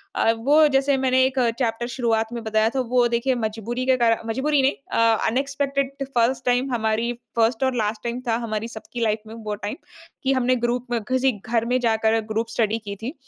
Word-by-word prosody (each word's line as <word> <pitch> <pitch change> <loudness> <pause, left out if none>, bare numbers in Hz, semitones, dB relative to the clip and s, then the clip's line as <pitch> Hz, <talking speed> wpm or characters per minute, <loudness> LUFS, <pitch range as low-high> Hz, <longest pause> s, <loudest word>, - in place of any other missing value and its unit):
अ, 225 - +3
वो 295 +6 +5
जैसे 275 0 +2
मैंने 260 0 +3
एक 265 0 -1 0.2
चैप्टर 235 -1 -1
शुरुआत 225 -2 0
में 235 -1 -5
बताया 220 0 +2
था, 265 - +1
वो 245 -1 +2
देखिए 235 +2 0
मजबूरी 230 +4 -3
के 260 0 +3
कारण 230 -2 +1
मजबूरी 280 +4 +1
नहीं 270 +2 +3 0.2
अ, 230 -1 +3
अनएक्सपेक्टेड 275 +2 -1 0.2
फ़र्स्ट 240 +2 +1
टाइम 250 +2 +1
हमारी 225 +1 0 0.3
फ़र्स्ट 225 +2 +2
और 260 -1 +1
लास्ट 215 -1 -2
टाइम 240 +1 -3
था 225 - +2
हमारी 215 +1 -3
सबकी 235 +1 -8
लाइफ़ 215 -1 -1
में 220 - -9
वो 210 -1 -3
टाइम, 205 - -3 0.5
कि 265 - +2
हमने 255 -1 +2
ग्रुप 245 +1 -2
में 240 - +1
किसी 260 0 +2
घर 230 0 0
में 250 +1 +1
जाकर 225 -1 +2
ग्रुप 225 +1 -1
स्टडी 225 -1 0
की 200 0 -5
थी। 255 +5 -3
235 Hz, 205 wpm, -23 LUFS, 225-260 Hz, 0.5 s, वो